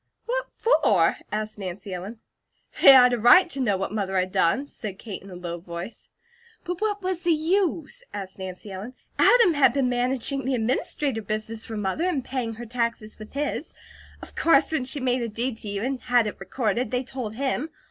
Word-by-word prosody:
"What - - -2
for?" 215 - +3
asked 215 0 -3
Nancy 190 0 -6
Ellen. 200 +6 -7 0.6
"They - - +11
had 250 -2 +7
a 240 - 0
right 355 - +7
to 275 - -2
know 210 -7 +1
what 190 0 -3
Mother 195 -3 -1
had 185 0 0
done," 190 +8 +2
said 210 -8 -7
Kate 210 -2 -7
in 195 - -13
a 180 - -9
low 175 -1 -5
voice. 170 +5 -8 0.5
"But 355 0 -5
what 415 -2 -1
was 365 -2 -2
the 350 - +2
use?" 350 +6 -1
asked 195 -1 -7
Nancy 190 +2 -7
Ellen. 205 +7 -7 0.2
"Adam 465 -8 +6
had 275 -5 +4
been 265 -2 +1
managing 255 +2 -1
the 265 0 0
administrator 245 +1 -1
business 215 +1 -4
for 220 - -5
Mother 210 - -1
and 275 -8 -2
paying 245 -4 -3
her 240 +2 -8
taxes 230 -2 -3
with 215 - -11
his, 290 +2 -3 0.5
of - - -12
course 325 -3 +4
when 305 -5 0
she 275 +3 -3
made 255 -1 0
a 235 - -1
deed 235 +2 -2
to 215 - -6
you, 200 +1 -3
and 265 0 -2
had 245 -2 +3
it 210 - -5
recorded, 235 -1 -1
they 250 +2 -1
told 245 -4 -6
him. 275 +3 -1
240 Hz, 200 wpm, -25 LUFS, 205-275 Hz, 0.6 s, They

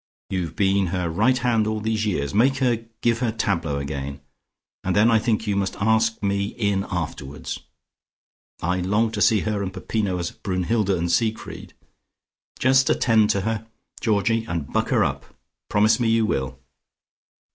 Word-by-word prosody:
You've 85 -4 -2
been 100 -1 +2
her 85 -1 -2
right 115 +9 +3
hand 120 -3 +1
all 110 0 -1
these 110 0 -1
years. 70 -7 -1
Make 130 +6 +3
her 120 -4 0 0.2
give 115 -1 +2
her 120 -3 0
tableaux 85 -9 -1
again. 70 0 -4 0.6
And 95 - 0
then 110 +3 +5
I 115 - +5
think 110 0 0
you 105 -2 0
must 100 -1 -1
ask 110 +1 +2
me 100 0 +1
in 100 -3 0
afterwards. 70 +2 -5 1.0
I 90 +2 0
long 105 +5 +1
to 105 -2 -3
see 110 -1 +4
her 105 -2 -1
and 95 -1 -3
Peppino 100 -1 -2
as 85 -1 -3
Brunnhilde 100 +3 -1
and 85 0 -1
Siegfried. 110 +3 -2 0.8
Just 130 +1 +4
attend 110 -3 +3
to 100 - +1
her, 110 +2 -3 0.3
Georgie, 110 +1 +1
and 85 -9 -4
buck - - +1
her - - +3
up. - - -2 0.5
Promise 105 +4 +3
me 120 -2 +2
you 115 0 +3
will. 65 -8 -2
105 Hz, 165 wpm, -23 LUFS, 90-115 Hz, 1.0 s, then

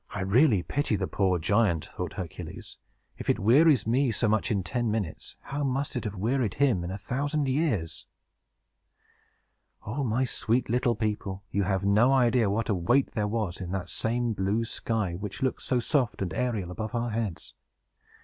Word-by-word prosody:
"I 105 - -4
really 105 - +4
pity 145 -1 0
the - - -1
poor 95 -3 +1
giant," 95 -1 +2
thought - - -6
Hercules. - - -7 0.4
"If - - -5
it - - +3
wearies 130 +5 +5
me 125 +4 +2
so 115 +1 0
much 110 +1 +1
in 100 -5 0
ten 120 +1 -1
minutes, 105 -7 -3
how 145 +1 -4
must 135 +1 -1
it 120 - -3
have 105 -1 -3
wearied 115 +2 0
him 130 -11 +2
in 85 - -4
a 95 - -4
thousand 140 +7 -1
years!" 130 - -1 1.8
O 125 +7 -2
my 120 +1 +1
sweet 120 -1 0
little 120 0 +2
people, 105 -3 -3
you 100 - +1
have 95 0 0
no 110 +7 +4
idea 120 -4 +3
what 110 +3 -1
a 105 - +2
weight 110 +10 +2
there 105 -2 -1
was 105 -5 -2
in 90 - -5
that 95 -2 -3
same 120 0 -1
blue 105 +3 0
sky, 110 -5 -2
which 100 +7 -5
looks 130 - -1
so 125 - +1
soft 120 -5 0
and 90 -4 -4
aerial 110 -5 -1
above 110 +5 -4
our 120 0 -1
heads! 105 -6 -4
110 Hz, 180 wpm, -28 LUFS, 100-125 Hz, 1.8 s, wearies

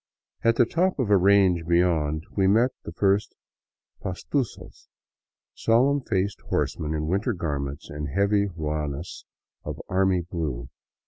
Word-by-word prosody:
At 115 0 +4
the 120 - +5
top 180 +9 +1
of 125 -7 0
a - - +7
range 95 -3 +4
beyond 85 -3 +1
we 95 -2 +3
met 115 +6 +4
the - - -5
first 100 +1 +1 0.7
pastusos, 110 +6 -4 0.7
solemn 135 +5 +2
faced 100 -4 -1
horsemen 75 +1 -1
in 75 0 -2
winter 95 +6 0
garments 70 -5 -4
and 75 0 -5
heavy 100 +7 +2
ruanas 75 -2 -4 0.4
of - - -6
army 95 -1 +2
blue. 75 -8 -4
95 Hz, 130 wpm, -25 LUFS, 80-105 Hz, 0.7 s, a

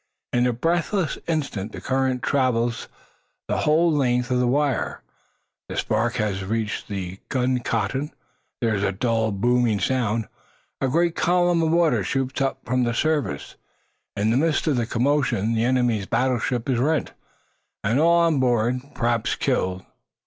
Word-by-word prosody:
In 120 0 +3
a - - +2
breathless 165 - 0
instant 140 - -2
the - - -6
current 130 -1 -1
traverses 120 -4 0 0.6
the - - -1
whole 165 +3 +3
length 125 -4 +1
of 125 - +2
the 125 - +2
wire. 140 -2 0 0.7
The - - -5
spark 110 +2 0
has 105 -4 -1
reached 110 +2 -2
the 95 -2 -5
gun 130 -1 +1
cotton! 135 +3 -2 0.5
There 115 -2 +1
is 100 - -1
a 100 - +1
dull, 115 +2 0
booming 120 +1 +2
sound; 115 -3 0 0.5
a 135 - +2
great 170 +5 +1
column 175 0 +2
of 160 - +1
water 160 - +3
shoots 135 +5 -2
up 135 0 -1
from 125 +1 +1
the 120 -1 0
surface. 150 - -1 0.6
In 105 +2 +2
the 120 - +2
midst 155 +1 +1
of 155 -4 +2
the 115 -2 0
commotion 120 -4 +1
the 115 +1 +1
enemy's 120 -5 +1
battleship 125 -1 0
is 130 -3 +1
rent, 150 +4 0 0.7
and 115 +6 +1
all 170 +2 +5
on 165 -4 +2
board, 120 -1 +2 0.2
perhaps 120 -1 0
killed. 95 0 -1
125 Hz, 155 wpm, -23 LUFS, 115-145 Hz, 0.7 s, all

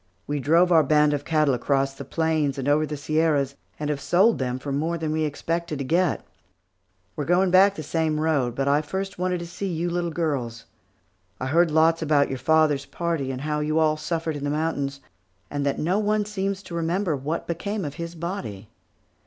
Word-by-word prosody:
We 145 0 -2
drove 165 +6 +3
our 165 -2 +7
band 150 0 +3
of 145 -1 -2
cattle 155 -4 +2
across 135 +2 0
the - - -8
plains 160 -4 0
and 135 0 -3
over 150 +2 +3
the 150 - -4
Sierras, 150 -2 +1 0.3
and 150 0 -1
have 140 -2 -3
sold 195 +9 +3
them 125 -1 -1
for 140 +2 -6
more 160 +5 -1
than 160 -1 -2
we 155 0 0
expected 165 +2 -3
to 140 - -4
get. 170 +5 +1 0.9
We - - -3
are - - -2
going 180 +2 +3
back 195 +2 +6
the 155 - -6
same 155 0 0
road, 145 -7 +1
but 140 +2 +2
first 190 +5 -4
I - - -4
wanted 180 0 +1
to - - -5
see 185 +3 -4
you 170 +1 -2
little 175 0 -1
girls. 135 -9 -2 0.7
I - - -3
heard 165 +5 +3
lots 160 +2 +3
about 150 -3 +3
your 130 - -4
father's 155 -3 +2
party, 165 -6 -2
and 130 -1 -4
how 150 +1 -1
you 155 +1 0
all 155 -1 +3
suffered 160 0 -3
in 145 - -5
the 145 - -1
mountains, 145 -2 -2 0.5
and 145 -1 -2
that 140 - 0
no 180 +6 +1
one 210 0 +1
seems 200 -1 -3
to 175 - -10
remember 170 +1 0
what 145 +5 -3
became 200 +3 -3
of 145 - -4
his 170 +2 -6
body. 165 - -5
155 Hz, 210 wpm, -24 LUFS, 145-170 Hz, 0.9 s, our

